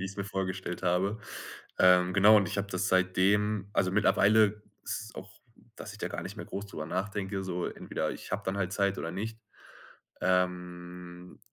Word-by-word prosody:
wie 95 Hz, -, -3 dB
ich's 95 Hz, +1 st, -6 dB
mir 100 Hz, -, -2 dB
vorgestellt 95 Hz, -2 st, -3 dB
habe. 95 Hz, +4 st, +1 dB, 0.6 s
Ähm, 90 Hz, 0 st, +5 dB
genau, 105 Hz, +2 st, +7 dB
und 100 Hz, -3 st, +3 dB
ich -, -, -3 dB
habe 100 Hz, 0 st, -1 dB
das 90 Hz, 0 st, 0 dB
seitdem 100 Hz, +2 st, +2 dB
also 95 Hz, -1 st, +2 dB
mittlerweile 105 Hz, +1 st, +4 dB, 0.2 s
ist -, -, -1 dB
es 110 Hz, -, -12 dB
auch, 95 Hz, -, -8 dB, 0.5 s
dass 110 Hz, -, -8 dB
ich 105 Hz, -, -12 dB
da -, -, -2 dB
gar -, -, -5 dB
nicht -, -, -7 dB
mehr -, -, -7 dB
groß 100 Hz, +1 st, -5 dB
drüber 80 Hz, -6 st, -6 dB
nachdenke 95 Hz, 0 st, -3 dB
so 90 Hz, -1 st, -2 dB
entweder -, -, -3 dB
ich -, -, -9 dB
habe 100 Hz, -, -1 dB
dann 95 Hz, +1 st, -1 dB
halt 95 Hz, -2 st, -1 dB
Zeit 100 Hz, -1 st, +1 dB
oder 80 Hz, -, -3 dB
nicht. 110 Hz, +5 st, -5 dB, 0.8 s
Ähm, 90 Hz, -1 st, -2 dB
95 Hz, 185 wpm, -30 LUFS, 90-100 Hz, 0.8 s, genau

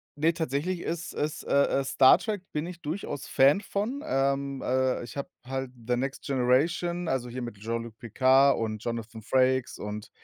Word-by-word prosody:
ne, 160 Hz, +3 st, +2 dB
tatsächlich 165 Hz, +3 st, -2 dB
ist 170 Hz, 0 st, -4 dB
ist 155 Hz, +3 st, -3 dB
äh, 140 Hz, 0 st, +2 dB
äh, -, -, 0 dB
Star 130 Hz, 0 st, +6 dB
Trek, 210 Hz, -3 st, -3 dB
bin 150 Hz, +2 st, -2 dB
ich 175 Hz, -1 st, -9 dB
durchaus 150 Hz, -3 st, -4 dB
Fan 140 Hz, +8 st, +4 dB
von, 225 Hz, +8 st, -3 dB
ähm, 135 Hz, 0 st, 0 dB
äh, 130 Hz, 0 st, +1 dB
ich 120 Hz, -, -9 dB
habe 140 Hz, +5 st, -4 dB, 0.2 s
halt 130 Hz, -1 st, -3 dB, 0.2 s
The 125 Hz, -, +2 dB
Next 135 Hz, +2 st, -3 dB
Generation, 160 Hz, +7 st, +1 dB
also 125 Hz, -3 st, -1 dB
hier 125 Hz, +2 st, -5 dB
mit 120 Hz, -3 st, -6 dB
Jean-Luc 115 Hz, +1 st, -4 dB
Picard 130 Hz, +4 st, +4 dB
und 110 Hz, -1 st, -3 dB
Jonathan 115 Hz, -1 st, -5 dB
Frakes 130 Hz, +2 st, +1 dB
und 105 Hz, +1 st, -6 dB
135 Hz, 175 wpm, -28 LUFS, 125-160 Hz, 0.2 s, Star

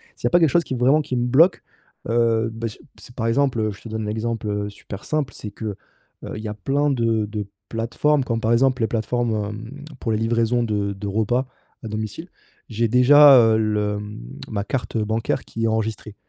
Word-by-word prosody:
s'il -, -, -7 dB
'y -, -, +5 dB
a -, -, +1 dB
pas 175 Hz, -, +4 dB
quelque 165 Hz, -, +5 dB
chose 170 Hz, +5 st, +3 dB
qui 130 Hz, -, -4 dB
vraiment, 130 Hz, +5 st, +3 dB
qui 135 Hz, -4 st, -3 dB
me 120 Hz, -, +1 dB
bloque, 160 Hz, +9 st, +4 dB, 0.5 s
heu 115 Hz, -1 st, +2 dB
bah, 115 Hz, 0 st, -4 dB
c 105 Hz, -, -13 dB, 0.2 s
c'est 120 Hz, -, -14 dB
par 115 Hz, -2 st, -1 dB
exemple, 130 Hz, 0 st, +1 dB
heu, 110 Hz, -1 st, 0 dB
je 100 Hz, -, -15 dB
te 115 Hz, -, -9 dB
donne 110 Hz, 0 st, -3 dB
l'exemple 110 Hz, +1 st, -3 dB
heu, 105 Hz, 0 st, -2 dB
super 100 Hz, -1 st, -10 dB
simple 150 Hz, -6 st, -2 dB
c'est 105 Hz, -, -8 dB
que 105 Hz, 0 st, -5 dB, 0.5 s
heu, -, -, -6 dB
il -, -, -6 dB
y -, -, -4 dB
a 105 Hz, -, -3 dB
plein 140 Hz, +8 st, 0 dB
de 115 Hz, -5 st, +1 dB
de 105 Hz, 0 st, -4 dB, 0.2 s
plateformes 120 Hz, +6 st, 0 dB
comme 115 Hz, -3 st, -2 dB
par 115 Hz, +1 st, +1 dB
exemple 125 Hz, +1 st, +2 dB
les 110 Hz, -, +2 dB
plateformes, 120 Hz, +2 st, -1 dB
hem, 110 Hz, +7 st, -8 dB, 0.2 s
pour 115 Hz, -, -1 dB
les -, -, +1 dB
livraisons 115 Hz, +2 st, +1 dB
de 105 Hz, -3 st, -1 dB
de 100 Hz, +1 st, -6 dB
repas 110 Hz, +5 st, 0 dB, 0.4 s
à -, -, -5 dB
domicile, 110 Hz, -, -5 dB, 0.4 s
j'ai 115 Hz, 0 st, 0 dB
déjà, 135 Hz, +4 st, +8 dB
heu, 110 Hz, -1 st, +4 dB
le, 105 Hz, -1 st, 0 dB
mmh, 105 Hz, 0 st, -8 dB, 0.3 s
ma 100 Hz, -2 st, -2 dB
carte 125 Hz, +1 st, -3 dB
bancaire 110 Hz, +1 st, -1 dB
qui 115 Hz, 0 st, -3 dB
est -, -, +3 dB
enregistrée. 110 Hz, -1 st, -2 dB
115 Hz, 220 wpm, -22 LUFS, 110-125 Hz, 0.5 s, déjà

